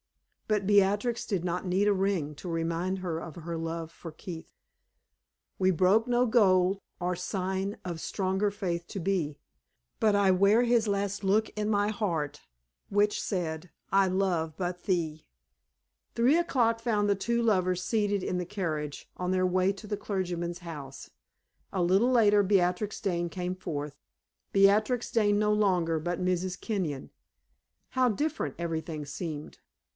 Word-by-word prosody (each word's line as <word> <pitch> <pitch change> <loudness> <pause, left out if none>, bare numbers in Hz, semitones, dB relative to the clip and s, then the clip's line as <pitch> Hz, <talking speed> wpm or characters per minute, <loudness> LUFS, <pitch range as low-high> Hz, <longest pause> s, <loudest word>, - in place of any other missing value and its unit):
But 210 -2 +1
Beatrix 205 +4 +3
did 185 -5 -2
not 180 +1 -2
need 190 +3 +2
a 205 - +5
ring 190 -6 0
to 175 - -7
remind 170 +3 -1
her 175 -3 -3
of 165 -2 -8
her 170 0 -5
love 165 0 -4
for 165 0 -10
Keith. 165 +1 -9 1.1
"We 190 0 +4
broke 190 +7 +3
no 245 0 +3
gold 195 -5 +4 0.2
or 180 +1 -1
sign 190 +3 -2
Of 170 -3 -4
stronger 190 +1 0
faith 175 -4 -3
to 195 - -5
be; 170 -5 -1 0.6
But 215 -2 +4
I 200 -1 +4
wear 200 +5 +4
his 235 -2 +3
last 200 0 -1
look 210 +3 +2
in 210 0 -3
my 205 -1 +2
heart, 165 -9 -2 0.5
Which 205 +1 +2
said, 170 -2 -3 0.2
'I 195 0 +5
love 180 -4 0
but 180 -1 -3
thee!'" 160 -5 -1 0.9
Three 245 +6 +4
o'clock 235 -9 +2
found 215 -3 +1
the 200 - +3
two 235 +4 0
lovers 185 -5 +2
seated 205 -3 0
in 180 - -1
the 180 - -2
carriage 160 -7 -4
on 180 0 -2
their 185 0 +2
way 185 +1 +2
to 200 +2 -10
the 205 - -1
clergyman's 175 -4 -3
house. 150 -6 -9 0.6
A 185 - -1
little 195 +8 +3
later 210 -4 +5
Beatrix 190 +1 +1
Dane 175 -4 -1
came 180 +1 -3
forth, 150 -5 -5 0.6
Beatrix 215 +5 +3
Dane 205 -2 +3
no 210 0 +3
longer, 180 -6 +2
but 175 +2 -2
Mrs. 185 0 -1
Kenyon. 175 - -3 0.8
How 255 -1 +3
different 300 +8 -2
everything 160 -2 -3
seemed! 150 0 -6
185 Hz, 150 wpm, -29 LUFS, 170-205 Hz, 1.1 s, a